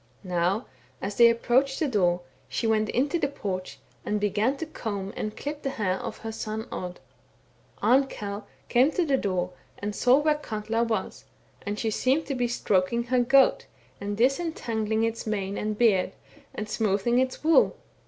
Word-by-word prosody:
'* -, -, -33 dB
Now 180 Hz, +3 st, 0 dB, 0.3 s
as 200 Hz, +1 st, -4 dB
they 235 Hz, -1 st, +8 dB
approached 260 Hz, +4 st, +2 dB
the 315 Hz, -, +1 dB
door, 180 Hz, -7 st, +2 dB, 0.3 s
she -, -, -2 dB
went 215 Hz, -1 st, +2 dB
into 285 Hz, +7 st, +1 dB
the 285 Hz, -, +1 dB
porch, 190 Hz, -9 st, -5 dB, 0.3 s
and 210 Hz, 0 st, -1 dB
began 210 Hz, +6 st, +1 dB
to 325 Hz, -, -4 dB
comb 200 Hz, -10 st, -5 dB
and 215 Hz, 0 st, -4 dB
clip 290 Hz, +1 st, -5 dB
the 275 Hz, -, -2 dB
hair 195 Hz, -7 st, -1 dB
of -, -, -5 dB
her 225 Hz, -, -2 dB
son 220 Hz, +1 st, -4 dB
Odd. 180 Hz, -1 st, -5 dB, 0.8 s
Arnkell 210 Hz, -6 st, +1 dB, 0.2 s
came 255 Hz, +4 st, +4 dB
to 355 Hz, -, +1 dB
the 280 Hz, -3 st, +2 dB
door 185 Hz, -5 st, -1 dB, 0.3 s
and 205 Hz, 0 st, -4 dB
saw 250 Hz, +2 st, +5 dB
where 300 Hz, +1 st, +3 dB
Katla 225 Hz, -6 st, -2 dB
was, 225 Hz, -1 st, -3 dB, 0.4 s
and 205 Hz, +1 st, -4 dB
she 220 Hz, +1 st, -1 dB
seemed 265 Hz, +8 st, +1 dB
to 280 Hz, -, -2 dB
be 245 Hz, -2 st, 0 dB
stroking 235 Hz, -1 st, +1 dB
her 250 Hz, +1 st, +1 dB
goat, 270 Hz, +2 st, +4 dB, 0.3 s
and 205 Hz, 0 st, -4 dB
disentangling 230 Hz, -5 st, 0 dB
its 225 Hz, 0 st, -2 dB
mane 200 Hz, -2 st, -2 dB
and 210 Hz, 0 st, -2 dB
beard 210 Hz, -6 st, +3 dB, 0.4 s
and 215 Hz, -, -4 dB
smoothing 215 Hz, +3 st, +1 dB
its 260 Hz, +2 st, -1 dB
wool. 320 Hz, +1 st, +4 dB
225 Hz, 175 wpm, -27 LUFS, 205-260 Hz, 0.8 s, they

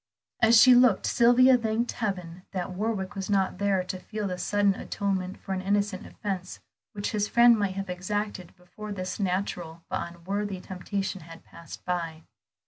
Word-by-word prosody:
As 225 Hz, 0 st, +7 dB
she 255 Hz, +1 st, +8 dB
looked, 245 Hz, -5 st, +5 dB
Sylvia 250 Hz, +2 st, +5 dB
thanked 225 Hz, +1 st, -1 dB
heaven 180 Hz, -5 st, -4 dB
that 185 Hz, -1 st, -3 dB
Warwick 200 Hz, 0 st, -2 dB
was 195 Hz, -1 st, -5 dB
not 195 Hz, -2 st, +1 dB
there 200 Hz, -2 st, +1 dB
to 185 Hz, 0 st, -5 dB
feel 210 Hz, +2 st, -4 dB
the 180 Hz, -1 st, -4 dB
sudden 205 Hz, 0 st, +2 dB
atonement 190 Hz, -2 st, -3 dB
for 195 Hz, -, -5 dB
an 185 Hz, -, -2 dB
innocent 200 Hz, 0 st, -1 dB
offence 190 Hz, -3 st, -5 dB, 0.3 s
which 205 Hz, -1 st, -3 dB
his 210 Hz, -1 st, 0 dB
friend 235 Hz, +1 st, +6 dB
might 200 Hz, -3 st, -1 dB
have 195 Hz, 0 st, -4 dB
exacted 185 Hz, +1 st, -4 dB
before 210 Hz, +4 st, -10 dB
this 185 Hz, -1 st, -4 dB
natural 180 Hz, -4 st, -2 dB
but 185 Hz, -2 st, -3 dB
unworthy 195 Hz, +2 st, -3 dB
temptation 190 Hz, +1 st, -4 dB
had 165 Hz, +1 st, -12 dB
passed 170 Hz, -, -12 dB
by. 165 Hz, -3 st, -3 dB
195 Hz, 165 wpm, -27 LUFS, 180-210 Hz, 0.3 s, she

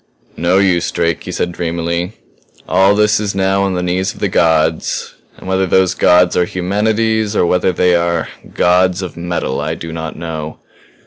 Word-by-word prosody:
"No 85 Hz, +3 st, +1 dB
use, 95 Hz, -3 st, +2 dB
Drake," 85 Hz, -1 st, -1 dB
he -, -, -5 dB
said 90 Hz, -, -2 dB
dreamily. 85 Hz, +2 st, -3 dB, 0.5 s
"All 95 Hz, +3 st, +3 dB
this 105 Hz, 0 st, +3 dB
is 105 Hz, -2 st, -3 dB
now 95 Hz, 0 st, +1 dB
on 95 Hz, -1 st, 0 dB
the 90 Hz, -, -2 dB
knees 90 Hz, +2 st, -1 dB
of -, -, -14 dB
the 100 Hz, -, 0 dB
gods. 80 Hz, -2 st, +1 dB, 0.2 s
And -, -, -12 dB
whether 95 Hz, 0 st, +1 dB
those 95 Hz, 0 st, +3 dB
gods 90 Hz, 0 st, +3 dB
are 90 Hz, -, +2 dB
humanity's 105 Hz, +4 st, 0 dB
or -, -, +3 dB
whether 90 Hz, +1 st, +1 dB
they 90 Hz, 0 st, +2 dB
are 85 Hz, -1 st, 0 dB, 0.2 s
Gods 90 Hz, +1 st, +2 dB
of 90 Hz, -, -7 dB
Metal 85 Hz, -6 st, -3 dB
I 80 Hz, +2 st, -2 dB
do 80 Hz, 0 st, -7 dB
not 80 Hz, -1 st, -5 dB
know. 80 Hz, -2 st, -6 dB
90 Hz, 180 wpm, -16 LUFS, 85-95 Hz, 0.5 s, All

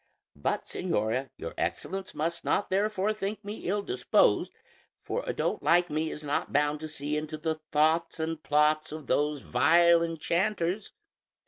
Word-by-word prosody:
But, 70 Hz, -, -1 dB
señora, 115 Hz, +6 st, -1 dB
your -, -, -6 dB
Excellence 190 Hz, 0 st, -3 dB
must 170 Hz, +2 st, -2 dB
not 200 Hz, -, 0 dB
therefore 205 Hz, +1 st, +1 dB
think 210 Hz, 0 st, -4 dB
me 205 Hz, +2 st, -5 dB
ill 205 Hz, +1 st, 0 dB
disposed, 125 Hz, -8 st, +2 dB, 0.5 s
for -, -, -2 dB
a -, -, +1 dB
dolt -, -, -1 dB
like 175 Hz, +1 st, +3 dB
me 155 Hz, +1 st, 0 dB
is 150 Hz, -, -7 dB
not 145 Hz, 0 st, -1 dB
bound 145 Hz, +1 st, +2 dB
to 155 Hz, -, -5 dB
see 150 Hz, 0 st, -3 dB
into 155 Hz, 0 st, -3 dB
the 160 Hz, 0 st, -2 dB
thoughts 160 Hz, +3 st, +2 dB
and 160 Hz, 0 st, -2 dB
plots 150 Hz, +1 st, +2 dB
of 155 Hz, -1 st, -7 dB
those 145 Hz, +1 st, +1 dB
vile 170 Hz, +3 st, +5 dB
enchanters. 170 Hz, +4 st, -1 dB
160 Hz, 155 wpm, -29 LUFS, 150-185 Hz, 0.5 s, vile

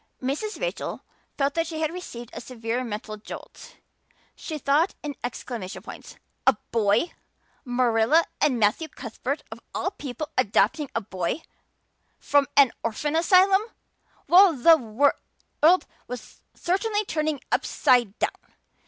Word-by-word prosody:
Mrs. 290 Hz, +12 st, -3 dB
Rachel -, -, -4 dB, 0.3 s
felt 280 Hz, 0 st, +1 dB
that 330 Hz, 0 st, 0 dB
she 320 Hz, -1 st, -5 dB
had 315 Hz, 0 st, -1 dB
received 240 Hz, -10 st, -8 dB
a -, -, -6 dB
severe 235 Hz, 0 st, -3 dB
mental 215 Hz, -2 st, -5 dB
jolt. 210 Hz, -, -11 dB, 0.6 s
She 315 Hz, -, -6 dB
thought 295 Hz, +5 st, +2 dB
in 295 Hz, -1 st, -3 dB
exclamation 240 Hz, -5 st, -5 dB
points. -, -, -10 dB, 0.3 s
A -, -, +8 dB, 0.2 s
boy! 220 Hz, -, +2 dB, 0.5 s
Marilla 245 Hz, +5 st, +3 dB, 0.2 s
and 275 Hz, -5 st, +3 dB
Matthew 220 Hz, +9 st, +2 dB
Cuthbert 260 Hz, +2 st, -5 dB
of -, -, -8 dB, 0.2 s
all -, -, -1 dB
people 290 Hz, +2 st, -6 dB
adopting 275 Hz, +6 st, +2 dB
a 230 Hz, -, +1 dB
boy! 190 Hz, -, -3 dB, 0.7 s
From 285 Hz, -1 st, +2 dB
an 275 Hz, -4 st, +7 dB
orphan 290 Hz, +7 st, -2 dB
asylum! 375 Hz, +4 st, +5 dB, 0.7 s
Well, 370 Hz, 0 st, +7 dB
the 325 Hz, +6 st, +7 dB
world 285 Hz, +6 st, +1 dB, 0.2 s
was 250 Hz, -2 st, -9 dB
certainly 415 Hz, +4 st, 0 dB
turning 310 Hz, -4 st, -1 dB
upside 240 Hz, -5 st, +2 dB
down! -, -, -4 dB
280 Hz, 125 wpm, -25 LUFS, 235-325 Hz, 0.7 s, A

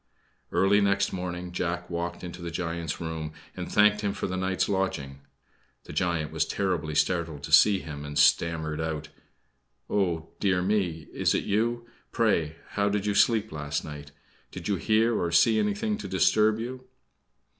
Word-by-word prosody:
Early 100 Hz, +2 st, +4 dB
next 100 Hz, 0 st, +2 dB
morning 90 Hz, -1 st, -4 dB
Jack 85 Hz, 0 st, -2 dB
walked 85 Hz, 0 st, -4 dB
into 90 Hz, 0 st, -7 dB
the 85 Hz, -, -4 dB
giant's 85 Hz, -2 st, -3 dB
room 80 Hz, -2 st, -5 dB, 0.2 s
and -, -, -6 dB
thanked 105 Hz, 0 st, +4 dB
him 100 Hz, -1 st, -1 dB
for -, -, -4 dB
the 95 Hz, -, -3 dB
night's 95 Hz, 0 st, 0 dB
lodging. 95 Hz, -9 st, -2 dB, 0.6 s
The -, -, -10 dB
giant 85 Hz, -2 st, 0 dB
was -, -, +1 dB
terribly 85 Hz, -6 st, -2 dB
startled 80 Hz, -4 st, 0 dB
to 80 Hz, -, -6 dB
see 100 Hz, +5 st, +7 dB
him, 75 Hz, -2 st, -7 dB
and 75 Hz, 0 st, -6 dB
stammered 80 Hz, +1 st, +2 dB
out: 80 Hz, -1 st, -3 dB, 0.8 s
"Oh, 85 Hz, -5 st, 0 dB
dear 90 Hz, -3 st, +2 dB
me! 90 Hz, -6 st, 0 dB
Is -, -, +1 dB
it -, -, 0 dB
you? 120 Hz, +3 st, 0 dB, 0.2 s
Pray, 85 Hz, -9 st, +1 dB
how 100 Hz, 0 st, 0 dB
did 100 Hz, 0 st, -1 dB
you 105 Hz, -, +1 dB
sleep 110 Hz, +1 st, +3 dB
last 70 Hz, -1 st, -3 dB
night? 75 Hz, -1 st, -9 dB, 0.4 s
Did 90 Hz, -2 st, -7 dB
you 100 Hz, -, +1 dB
hear 110 Hz, +5 st, +2 dB
or 85 Hz, -4 st, -1 dB
see 110 Hz, +6 st, +5 dB
anything 210 Hz, +1 st, -1 dB
to -, -, -5 dB
disturb 110 Hz, 0 st, +3 dB
you?" 130 Hz, +2 st, -6 dB
90 Hz, 165 wpm, -27 LUFS, 80-105 Hz, 0.8 s, see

